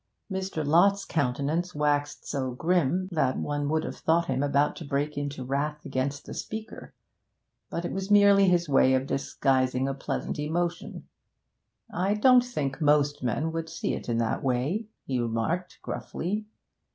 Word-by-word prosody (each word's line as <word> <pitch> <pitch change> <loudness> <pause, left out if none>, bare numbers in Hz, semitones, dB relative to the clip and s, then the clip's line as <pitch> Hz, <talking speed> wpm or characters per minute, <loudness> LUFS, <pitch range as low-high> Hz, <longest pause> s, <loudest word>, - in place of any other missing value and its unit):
Mr. 190 -5 -3
Lott's 195 +6 +4
countenance 150 +5 -1
waxed 145 0 0
so 135 -3 -2
grim 175 +4 +1
that 135 -6 +1
one 145 -1 -2
would 155 0 +1
have - - -5
thought 170 +1 +2
him 130 -2 -1
about 145 0 +2
to - - -7
break 145 +1 -2
into 145 -2 -4
wrath 145 +3 -2
against 140 +1 -2
the - - -7
speaker. 220 0 -7 0.7
But 170 - -3
it - - -3
was 195 +1 -4
merely 200 -1 +6
his 175 -1 +2
way 130 -2 +4
of 130 0 0
disguising 130 -1 0
a 135 - -1
pleasant 135 - -4
emotion. 170 +3 -3 0.9
'I 190 +4 +1
don't 250 +3 +6
think 150 - -3
most 145 -1 +3
men 135 +6 -1
would 165 0 -4
see 165 - -2
it - - -5
in 115 - +1
that 115 -1 0
way,' 140 - -1 0.2
he 130 -2 -1
remarked 120 +11 -2
gruffly. 210 +5 -4
150 Hz, 160 wpm, -27 LUFS, 135-175 Hz, 0.9 s, merely